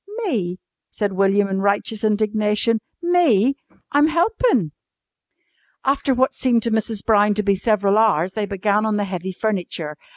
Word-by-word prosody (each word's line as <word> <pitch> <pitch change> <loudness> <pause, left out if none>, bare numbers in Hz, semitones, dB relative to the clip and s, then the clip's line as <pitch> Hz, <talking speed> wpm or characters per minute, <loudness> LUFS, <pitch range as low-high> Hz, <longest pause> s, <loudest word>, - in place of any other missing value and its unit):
"Me?" 195 - -2 0.3
said 205 -2 -3
William 195 +1 +2
in 195 0 -2
righteous 205 +2 -1
indignation. 215 +1 +1 0.2
"Me? 290 - +3 0.4
I'm 295 0 +4
helpin'!" 340 - +1 1.1
After 270 0 +1
what 260 +1 +1
seemed 240 -3 +1
to 230 - -1
Mrs. 220 -1 -1
Brown 210 -1 +3
to 210 - 0
be 200 -1 +2
several 205 0 +1
hours 190 -5 +2
they 210 -1 -3
began 205 +1 0
on 215 -1 0
the 205 - -1
heavy 185 -1 -5
furniture. 180 -6 -4
210 Hz, 150 wpm, -20 LUFS, 195-235 Hz, 1.1 s, I'm